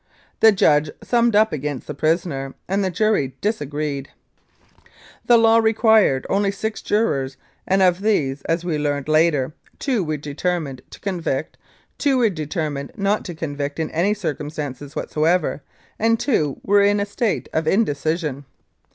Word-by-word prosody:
The 220 - +7
judge 150 -6 +3
summed 235 -2 +2
up 215 -2 +4
against 145 -2 -4
the 150 - -5
prisoner, 145 -3 -1
and 195 +2 0
the 190 - 0
jury 195 - 0
disagreed. 145 -8 -3 1.2
The 240 - +7
law 225 0 +5
required 220 - +3
only 200 0 +1
six 215 +2 -4
jurors, 140 -12 0 0.3
and 190 0 +3
of 180 0 +3
these, 145 -11 +1
as 165 +1 -1
we 160 -4 -1
learned 145 -1 -1
later, 155 -3 +2 0.2
two 250 -8 0
were 155 -2 -2
determined 145 -1 -3
to - - -12
convict, 170 -7 -3 0.4
two 280 -3 +2
were 235 -4 +3
determined 150 -3 -4
not 200 +1 +1
to 175 - -6
convict 145 -3 -4
in 160 - -2
any 185 +6 +1
circumstances 150 -5 -5
whatsoever, 160 -1 0 0.4
and 230 +1 +2
two 155 - 0
were 205 +1 +4
in 205 +1 +3
a 200 - 0
state 210 +1 -2
of 160 0 0
indecision. 155 - 0
165 Hz, 150 wpm, -21 LUFS, 145-205 Hz, 1.2 s, The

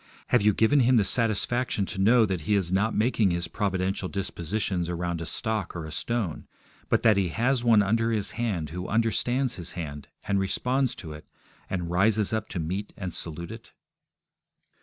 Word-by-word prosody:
Have 120 - +4
you 105 +1 +5
given 110 +8 +3
Him 125 0 +4
the 105 - +4
satisfaction 115 0 0
to 95 - -7
know 115 +3 +5
that 95 -5 -2
He 105 - +4
is 95 -3 0
not 100 +4 +1
making 110 -2 +2
His 85 -1 -1
providential 95 -2 -1
dispositions 95 -1 -2
around 85 -1 -2
a 85 - -5
stock 110 -7 -2
or 85 -2 -4
a 80 - -7
stone, 105 0 -2 0.4
but - - +2
that 110 -3 +5
He 95 -2 +2
has 120 +7 +1
one 115 -3 +5
under 115 +3 +1
His 105 -3 0
hand 95 -11 -2
who 90 +2 -5
understands 120 +3 +1
His 85 -3 -7
hand, 75 -4 -6 0.2
and 100 -1 +2
responds 125 +6 0
to 80 -4 -8
it, 75 - -12 0.4
and 85 -3 -3
rises 105 +4 +2
up 110 -1 -2
to 90 - -4
meet 95 +6 -3
and 95 -4 -5
salute 85 +2 -4
it? 115 0 -11
100 Hz, 185 wpm, -27 LUFS, 90-115 Hz, 0.4 s, you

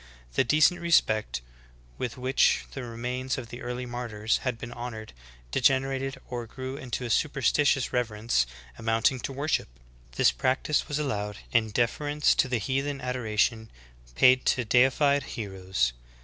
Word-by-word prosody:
The - - +3
decent 155 +7 +4
respect 110 - +2 0.6
with 125 -2 -3
which 130 +1 +2
the 135 - -6
remains 125 +3 -3
of 120 -3 -7
the 120 - -8
early 125 +1 -4
martyrs 115 -3 -1
had 125 -3 -3
been 120 +1 -8
honored 120 - -7 0.4
degenerated 135 +1 +1
or 120 -2 -5
grew 130 +3 -6
into 130 -2 -4
a - - -4
superstitious 140 0 +2
reverence 110 - 0 0.3
amounting 115 +4 +1
to 135 - -4
worship. 145 +3 -1 0.5
This - - +4
practice 135 +3 0
was 145 - -2
allowed 105 -8 -2
in 115 -2 +2
deference 145 +7 +1
to - - +2
the 125 -1 0
heathen 135 +5 -2
adoration 115 -3 0 0.5
paid 130 - +6
to 125 - +2
deified 135 +5 +4 0.2
heroes. 95 - -1
125 Hz, 140 wpm, -27 LUFS, 115-135 Hz, 0.6 s, paid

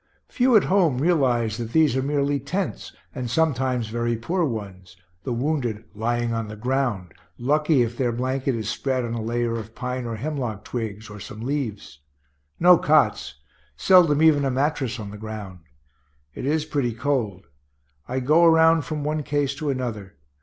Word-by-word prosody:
Few 250 -1 +3
at 210 - +6
home 180 -9 +2
realize 125 -8 +1
that 115 -1 -6
these 155 -5 +4
are 130 - +1
merely 140 0 0
tents, 175 +8 -4 0.2
and 125 -4 -4
sometimes 130 -5 0
very 120 +1 -1
poor 170 +11 -1
ones, 95 - -5 0.3
the - - -2
wounded 120 -4 -1
lying 120 +2 -1
on 115 -1 -2
the 105 - -8
ground, 120 -6 -2 0.2
lucky 150 +1 +2
if 120 0 -4
their 120 -1 0
blanket 130 +2 -1
is 110 -3 -4
spread 130 +2 -1
on 115 - -4
a 115 - -3
layer 115 +1 -1
of 110 +1 -10
pine 125 -2 -4
or 115 - -4
hemlock 125 -4 -4
twigs, 110 -3 -5
or 105 -1 -10
some 105 +2 -9
leaves. 120 - -4 0.6
No 175 0 +7
cots; 150 - +2 0.4
seldom 165 - +5
even 150 -3 +5
a 135 - +1
mattress 135 -2 -1
on 100 -2 -7
the 105 - -9
ground. 105 -4 -7 0.7
It 130 - -5
is 155 +1 +1
pretty 140 -6 -1
cold. 115 -7 -2 0.6
I 130 +1 -2
go 155 +6 +4
around 160 -1 +5
from 155 -2 -4
one 150 +1 -1
case 145 -1 -1
to 150 0 -3
another. 120 -7 -4
125 Hz, 170 wpm, -24 LUFS, 115-150 Hz, 0.7 s, No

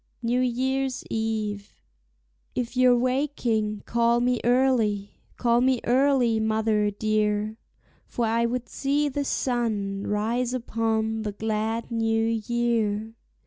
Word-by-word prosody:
NEW 240 +2 +1
YEAR'S 260 +1 -1
EVE. 215 -2 -3 0.8
If 245 0 -3
you're 250 -1 +5
waking, 240 -5 0
call 235 0 +2
me 245 0 +1
early, 235 -5 +1 0.2
call 235 0 +2
me 255 -1 +3
early, 250 -3 +3
mother 220 -1 +1
dear, 215 +1 -1 0.5
For 240 - -1
I 230 +1 +1
would 245 0 -3
see 290 +2 0
the 285 +1 -2
sun 215 -7 -1
rise 235 +4 0
upon 225 -2 -1
the 210 -2 -4
glad 220 +2 -2
new 225 -1 +1
year. 225 -1 0
230 Hz, 115 wpm, -25 LUFS, 215-250 Hz, 0.8 s, you're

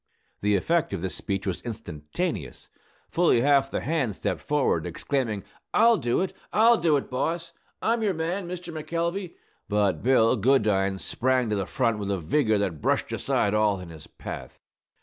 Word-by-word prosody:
The 105 0 +2
effect 165 - +1
of 95 - -3
this 95 - -2
speech 100 -1 -3
was 95 -3 -2
instantaneous. 90 - -5 0.4
Fully 165 -8 +3
half 140 0 +4
the - - -2
hands 140 - -1
stepped - - -2
forward, 150 -2 +1
exclaiming, 120 -8 -2 0.3
"I'll 230 +1 +6
do 120 +2 0
it! 190 - -2 0.2
I'll 230 +2 +5
do 155 -3 +3
it, 140 - -4
boss! 165 +6 -2 0.3
I'm 230 +1 +2
your 205 -4 +1
man, 170 +4 -2
Mr. 175 -1 -6
McElvey!" 170 +4 -3 0.3
But 105 -2 +1
Bill 125 -1 +4
Goodine 105 -5 +2
sprang 125 +2 0
to - - +2
the 100 -3 -2
front 115 +4 0
with 100 -1 -3
a 100 - 0
vigor 110 - +2
that 95 -7 -2
brushed - - 0
aside 100 - 0
all 105 -2 +2
in 90 -2 -9
his 80 -2 -11
path. - - -8
125 Hz, 170 wpm, -26 LUFS, 100-165 Hz, 0.4 s, I'll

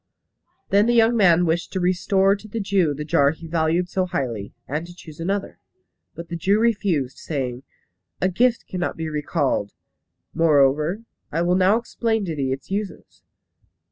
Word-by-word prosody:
Then 200 +3 +4
the 240 - +3
young 230 +1 +4
man 175 -5 +4
wished 165 +1 -1
to 190 - -1
restore 190 +2 +2
to 210 +1 -12
the 225 +2 -4
Jew 190 -7 +1
the 150 +2 -5
jar 140 -2 +3
he 160 +2 -7
valued 165 +2 0
so 185 +1 -1
highly, 115 - -3 0.2
and 155 +5 -3
to 175 - -12
choose 155 -3 -13
another. 195 +4 -3 0.6
But 170 0 -8
the 170 - -4
Jew 195 +5 +2
refused, 195 - 0
saying, 130 -5 -4 0.6
"A 185 - +2
gift 235 +6 +1
cannot 180 -1 -3
be 160 -1 -3
recalled. 145 -8 -1 0.6
Moreover, 155 +5 +2 0.3
I 165 +3 0
will 175 +1 +2
now 190 +3 +4
explain 225 -2 -1
to 165 -3 -3
thee 135 -3 -1
its 135 +7 -6
uses. 200 0 -5
175 Hz, 170 wpm, -22 LUFS, 150-200 Hz, 0.6 s, Then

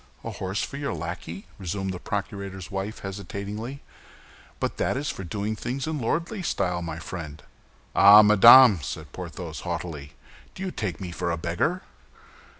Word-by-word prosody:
"A - - -4
horse 95 +2 -3
for 140 - -5
your 140 -6 -3
lackey?" 85 +2 -6
resumed 95 +1 -3
the 90 - -6
procurator's 100 -2 -5
wife, 95 +3 -4
hesitatingly; 100 +6 -6 0.8
"but - - -2
that - - 0
is 145 +1 -2
doing 100 +4 -4
things 125 +5 -3
in 155 -1 -3
lordly 170 - -2
style, 90 - -1
my 80 -2 -5
friend." 80 -3 -7 0.5
"Ah, 100 +2 +9
madame!" 105 - +8
said 70 - -6
Porthos, - - -7
haughtily; 75 -4 -5 0.4
"do 190 - -6
you 190 - -3
take 95 - -4
me 90 -2 -5
for 85 - -3
a 85 - -1
beggar?" 90 - -1
100 Hz, 150 wpm, -26 LUFS, 85-115 Hz, 0.8 s, Ah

